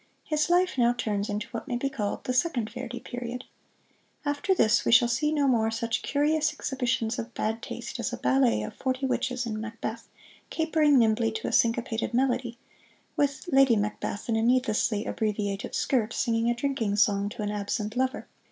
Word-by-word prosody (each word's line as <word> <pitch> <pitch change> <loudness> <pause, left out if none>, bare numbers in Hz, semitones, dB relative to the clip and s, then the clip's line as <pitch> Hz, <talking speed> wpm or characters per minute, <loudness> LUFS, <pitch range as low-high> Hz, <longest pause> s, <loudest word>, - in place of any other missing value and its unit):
His 305 +1 0
life 355 -5 +2
now 240 0 +4
turns 210 -4 -2
into 210 +1 -3
what 230 -3 -6
may 245 - -1
be 275 - -1
called 225 -7 -3
the 255 - -2
Second 255 -6 0
Verdi 245 0 -6
Period. 245 0 -6 0.8
After 290 +7 +1
this 215 -7 +3
we - - +1
shall 235 +1 +7
see 265 +6 +1
no 290 -2 +2
more 225 -4 +3
such 230 0 -2
curious 300 +1 +1
exhibitions 245 -5 -1
of 235 +1 -6
bad 220 +1 -2
taste 240 +1 -6
as 235 - -2
a - - -4
ballet 125 -4 +2
of 105 - -6
forty 260 0 -2
witches 255 -1 -1
in 215 -2 -3
"Macbeth," 225 0 -6 0.4
capering 315 -3 +3
nimbly 225 -1 +3
to 220 - -4
a - - -2
syncopated 230 0 +1
melody, 245 -2 0 0.6
with 285 +4 0
"Lady 270 -3 +5
Macbeth" 205 0 -3
in 230 - +1
a 225 - +1
needlessly 230 -3 +1
abbreviated 205 -2 -2
skirt 235 -4 0
singing 230 -1 +1
a 240 - +1
drinking 240 -5 -1
song 205 -1 +2
to 210 - -6
an 205 - -2
absent 210 +1 -3
lover. 260 +2 -1
235 Hz, 180 wpm, -27 LUFS, 220-265 Hz, 0.8 s, shall